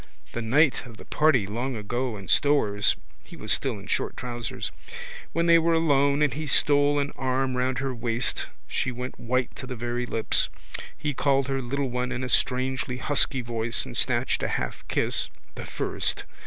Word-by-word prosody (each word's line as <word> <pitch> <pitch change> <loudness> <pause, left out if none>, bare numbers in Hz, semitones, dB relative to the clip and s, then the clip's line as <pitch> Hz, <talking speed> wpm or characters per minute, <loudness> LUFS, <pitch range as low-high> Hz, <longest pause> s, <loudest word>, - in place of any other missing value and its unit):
The 120 - -3
night 140 +6 +3
of 115 -2 -12
the - - -12
party 145 -9 +3
long 120 +6 -3
ago 120 +2 -2
in 95 -2 -9
Stoer's 105 -9 +3 0.3
(he - - -12
was - - -2
still 130 -6 +2
in 100 - -10
short - - -1
trousers) 120 -2 -4 0.6
when 170 0 +1
they 170 0 +7
were 165 0 +2
alone 140 -2 +3
and 145 -4 +2
he 155 +2 -4
stole 145 +2 +4
an 140 0 0
arm 130 0 0
round 125 0 0
her 135 0 -2
waist 120 0 0 0.2
she 125 - -1
went 125 +1 -6
white 125 +1 -1
to 130 - -7
the 125 - -5
very 120 +1 -3
lips. 115 -2 +1 0.5
He 150 -1 -2
called 135 -1 +2
her 135 0 0
little 135 +1 -2
one 125 +1 -1
in 130 0 -3
a 130 - -3
strangely 130 0 0
husky 135 0 +2
voice 115 -1 0
and - - -8
snatched - - +1
a - - 0
half - - -3
kiss - - +1 0.2
(the - - -7
first!) - - -1
130 Hz, 185 wpm, -26 LUFS, 120-140 Hz, 0.6 s, they